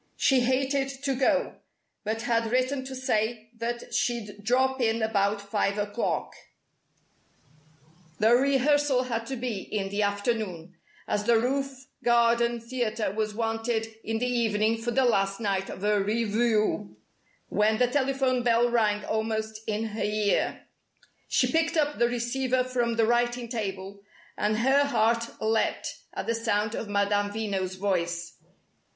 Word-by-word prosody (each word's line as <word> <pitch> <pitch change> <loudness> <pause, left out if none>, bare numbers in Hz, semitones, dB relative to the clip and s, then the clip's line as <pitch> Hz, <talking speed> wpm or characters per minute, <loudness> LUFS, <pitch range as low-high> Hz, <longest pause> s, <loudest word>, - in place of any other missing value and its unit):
She 265 -2 +4
hated 265 +2 +1
to 275 - +1
go, 275 +2 +1 0.5
but 220 +1 -2
had 230 -1 +1
written 255 +2 +1
to 265 0 -6
say 225 -2 -1
that 235 +1 -4
she'd 210 -4 -2
"drop 260 +3 +2
in 225 -1 +1
about 205 -1 +1
five 200 0 -1
o'clock" 205 +2 -2 1.8
the 220 +2 +4
rehearsal 275 +1 +3
had 230 -2 -3
to 265 - -3
be 235 -4 -3
in 195 0 -3
the 200 +2 -1
afternoon, 205 -4 -2 0.3
as 205 0 -1
the 235 0 +5
roof 270 +2 -2 0.2
garden 235 0 +3
theatre 230 -3 -2
was 215 0 -2
wanted 225 0 -1
in 225 +1 -2
the 245 - -1
evening 225 -2 +1
for 240 - -2
the 260 +2 +2
last 195 -3 +1
night 195 -3 -1
of 190 - -8
a 210 -1 +2
revue 215 - 0 0.5
when 215 +1 +2
the 250 - +4
telephone 265 -1 +1
bell 240 0 +3
rang 210 -3 +1
almost 220 0 -2
in 215 0 -1
her 215 +1 -5
ear. 210 -1 0 0.6
She - - +2
picked 325 0 +1
up 295 -1 +1
the 235 - +4
receiver 250 +2 0
from 245 -2 -1
the 225 -1 +3
writing 240 +1 +1
table, 200 -4 -5 0.3
and 215 +1 0
her 265 +5 +4
heart 230 -3 0
leaped 220 0 -1 0.2
at - - -3
the 230 - 0
sound 215 -2 0
of 220 - -4
Madame 205 0 +1
Veno's 200 -3 -2
voice. 175 -3 -2
230 Hz, 145 wpm, -27 LUFS, 210-250 Hz, 1.8 s, the